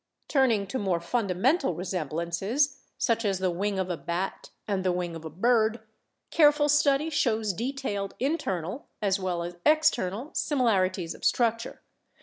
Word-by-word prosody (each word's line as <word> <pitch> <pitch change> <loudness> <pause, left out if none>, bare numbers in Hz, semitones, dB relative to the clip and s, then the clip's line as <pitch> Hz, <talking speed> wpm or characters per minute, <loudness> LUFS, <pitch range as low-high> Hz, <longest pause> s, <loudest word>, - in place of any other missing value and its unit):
Turning 250 -8 +2
to 260 +7 -4
more 190 -4 0
fundamental 235 - +1
resemblances, 180 - -1 0.2
such 230 -1 +1
as 200 -3 +1
the 185 -1 0
wing 195 +3 -1
of 190 -1 -1
a - - -1
bat 175 +3 -4 0.2
and 195 -3 -1
the 185 - +2
wing 175 -1 -3
of 165 - -8
a 160 - -6
bird, 220 +6 +2 0.5
careful 295 -2 +5
study 290 +1 +3
shows 220 -8 +1
detailed 225 -3 -3
internal 240 - -2
as 200 -1 +1
well 180 -2 -2
as 175 0 -7
external 290 - +2
similar 230 - +2
ities 180 -3 -5
of - - -15
structure. 230 -1 0
205 Hz, 150 wpm, -27 LUFS, 185-265 Hz, 0.5 s, careful